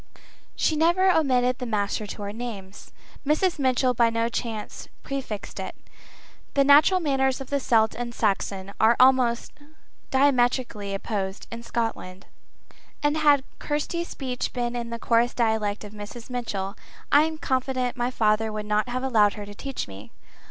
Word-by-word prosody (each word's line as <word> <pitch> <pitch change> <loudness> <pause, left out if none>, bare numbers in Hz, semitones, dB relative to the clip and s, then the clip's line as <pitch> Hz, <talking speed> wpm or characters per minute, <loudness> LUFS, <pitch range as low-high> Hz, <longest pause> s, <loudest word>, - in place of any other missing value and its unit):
She 315 - +1
never 345 +4 +4
omitted 255 -6 +2
the 250 - -4
Master 210 -1 -1
to 205 - -7
our 200 0 -5
names; 210 -5 -8 0.3
Mrs. 310 +3 +1
Mitchell 255 -1 +2
by 235 -1 +3
no 230 0 0
chance 225 -3 -5 0.2
prefixed 265 -7 -5
it. - - -5 0.8
The 280 - +5
natural 295 +7 +6
manners 265 -5 +1
of 270 0 -9
the 280 - +1
Celt 225 -5 +3
and 240 0 -4
Saxon 200 -3 -1
are 225 +2 +5
almost 255 -2 +4 0.6
diametrically 245 -6 +1
opposed 195 -1 -4
in 230 0 -6
Scotland. 225 -5 -4 0.8
And 295 +1 +2
had 290 -3 +4 0.2
Kirsty's 320 +4 -2
speech 255 -3 -4
been 240 -1 -2
in 235 -1 -4
the 235 - -4
coarse 235 +1 +2
dialect 220 -3 0
of 210 0 -10
Mrs. 215 +4 -9
Mitchell, 205 -5 -3 0.4
I 290 - +7
am 320 0 -4
confident 260 -3 -1
my 245 0 -1
father 220 -2 +1
would 215 0 -4
not 210 +3 0
have 255 +1 -2
allowed 215 -6 +3
her 205 -1 -7
to 205 - -10
teach 270 +5 -5
me. 100 +1 -11
240 Hz, 160 wpm, -25 LUFS, 215-265 Hz, 0.8 s, I